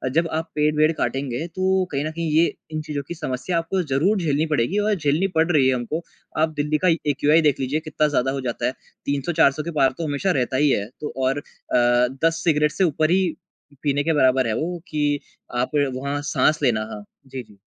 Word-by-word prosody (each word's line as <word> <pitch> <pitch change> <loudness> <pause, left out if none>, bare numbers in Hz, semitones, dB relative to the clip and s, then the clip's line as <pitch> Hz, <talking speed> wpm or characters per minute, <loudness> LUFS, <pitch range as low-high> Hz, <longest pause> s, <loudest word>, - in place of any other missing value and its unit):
जब 165 +1 +3
आप 165 - -4
पेड़-वेड 150 +1 +3
काटेंगे 135 +2 -2
तो 185 0 0 0.2
कहीं 140 0 -1
न 155 - -2
कहीं 165 0 -3
ये 160 +2 +5 0.3
इन 155 0 -3
चीज़ों 150 -2 -4
की - - -4
समस्या 155 +2 -2
आपको 165 +3 -1
ज़रूर 185 +10 +2
झेलनी 155 -4 +1
पड़ेगी 150 - +1
और 210 +1 +2
झेलनी 155 +2 +1
पड 160 +2 +3
रही 145 -5 +4
है 130 - +3
हमको। 125 +7 -3 0.4
आप 160 - +3
दिल्ली 150 +1 +1
का - - +5 0.2
एक्यूआई 150 +3 +3
देख 145 - +1
लीजिए 135 +3 -1
कितना 155 0 +1
ज़्यादा 135 -2 +1
हो 135 - -3
जाता - - -3
है। - - +2 0.3
300-400 145 +1 +2
के 170 - -4
पार 135 -1 +4
तो 165 - -3
हमेशा 150 +7 0
रहता 130 +2 -1
ही - - +4
है। 100 -6 +1 0.2
तो 150 - -4
और 135 +2 +1
अ, - - -13 0.8
10 165 0 +1
सिगरेट 150 -2 +3
से 190 - 0
ऊपर 155 +1 +1
ही 190 +1 +3 0.6
पीने 145 -1 +1
के 165 - +1
बराबर 130 -3 +3
है 110 - 0
वो 175 +5 -2
कि 145 -1 0 0.4
आप 125 - -2 0.2
वहाँ 140 +2 -3
साँस 155 0 +2
लेना 115 -5 +2
हाँ, 105 - -7 0.2
जी, 130 -1 -6
जी। 105 -2 -20
150 Hz, 215 wpm, -23 LUFS, 135-165 Hz, 0.8 s, ये